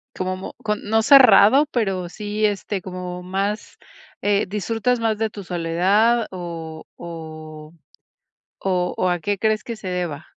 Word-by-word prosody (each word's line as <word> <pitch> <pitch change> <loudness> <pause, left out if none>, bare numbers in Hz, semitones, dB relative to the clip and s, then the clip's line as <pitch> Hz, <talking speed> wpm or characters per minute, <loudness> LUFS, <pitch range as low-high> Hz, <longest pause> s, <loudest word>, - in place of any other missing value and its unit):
Como 185 0 -4 0.3
no 220 +1 +1
cerrado, 260 0 +7
pero 190 -7 -1
sí, 210 +2 -2
este, 205 -1 -2
como 180 -1 -6
más, 195 +3 -3 0.4
eh, 205 0 +2
¿disfrutas 225 +5 -1
más 225 -2 0
de 220 0 0
tu 205 -2 -9
soledad 190 +7 +2
o 165 -3 -7
o 155 -2 -9 0.9
o 180 -2 -1
o 185 - +1
a 175 -1 0
qué 200 +4 -1
crees 215 +1 +1
que 235 - -5
se 215 -3 -7
deba? 175 -4 -3
195 Hz, 140 wpm, -22 LUFS, 175-215 Hz, 0.9 s, cerrado